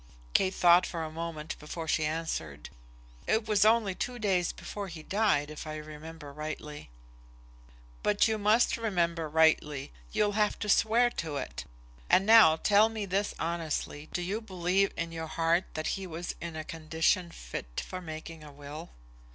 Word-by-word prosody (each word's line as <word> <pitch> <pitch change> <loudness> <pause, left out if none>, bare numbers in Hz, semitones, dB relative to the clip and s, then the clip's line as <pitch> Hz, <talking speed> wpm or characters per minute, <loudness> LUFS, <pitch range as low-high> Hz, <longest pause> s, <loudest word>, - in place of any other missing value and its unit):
Kate 185 0 +2
thought 175 0 +6
for 165 -2 -4
a 155 - -5
moment 160 -1 -5
before 160 +2 -6
she 155 0 +1
answered. 115 - -4 0.6
"It 220 0 +1
was 210 -2 +3
only 215 -2 +4
two 245 +6 -4
days 190 -6 +1
before 205 -1 -6
he 165 -3 -9
died, 190 -8 +1
if 155 +1 -8
I 155 - -4
remember 155 0 -9
rightly." 150 - -7 1.1
"But 210 +1 +3
you 220 -1 -1
must 215 +4 +3
remember 170 -7 0
rightly. 150 - +2 0.2
You'll 205 -1 +2
have 210 0 +1
to 210 - -4
swear 235 +4 +4
to 155 -4 -4
it. 65 - -5 0.4
And 190 - +5
now 220 -8 +8
tell 205 +6 +4
me 220 -2 -4
this 200 +2 -1
honestly; 160 -2 -3
do 175 - -2
you 200 +5 -2
believe, 190 -1 +1
in 170 0 -3
your 165 -1 -5
heart, 165 +2 +1
that 155 - -3
he 195 -1 -3
was 170 0 -5
in 170 -1 -5
a 155 - -4
condition 160 +2 0
fit - - -6
for 185 - -6
making 160 -1 -8
a 150 - -11
will?" 145 +3 -9
165 Hz, 170 wpm, -30 LUFS, 155-200 Hz, 1.1 s, now